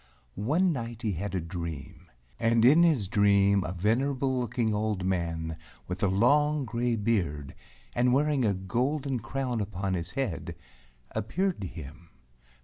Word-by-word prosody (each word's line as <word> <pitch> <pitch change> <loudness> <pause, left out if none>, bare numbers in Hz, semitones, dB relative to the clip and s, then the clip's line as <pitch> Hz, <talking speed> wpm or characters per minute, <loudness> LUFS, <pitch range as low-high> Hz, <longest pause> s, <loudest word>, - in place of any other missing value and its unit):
One 160 - +1
night 120 -2 -6
he 110 - +1
had 95 +2 -4
a - - +1
dream, 85 -4 -7 0.3
and 115 0 +3
in 150 +7 +7
his 150 - +3
dream 100 -1 +4
a - - -4
venerable 130 +8 0
looking 120 -2 0
old 105 -3 -1
man 85 -3 -2 0.3
with 90 +1 -4
a 100 - +3
long 145 +9 +3
gray 120 +1 0
beard, 90 -11 -1 0.4
and 125 +1 +2
wearing 145 0 +2
a 105 -3 +2
golden 130 +8 -1
crown 125 0 -2
upon 95 -1 -3
his 85 -1 -3
head, 130 -11 -2 0.6
appeared 170 - -1
to 95 - -3
him. 85 +1 -10
110 Hz, 145 wpm, -28 LUFS, 95-130 Hz, 0.6 s, in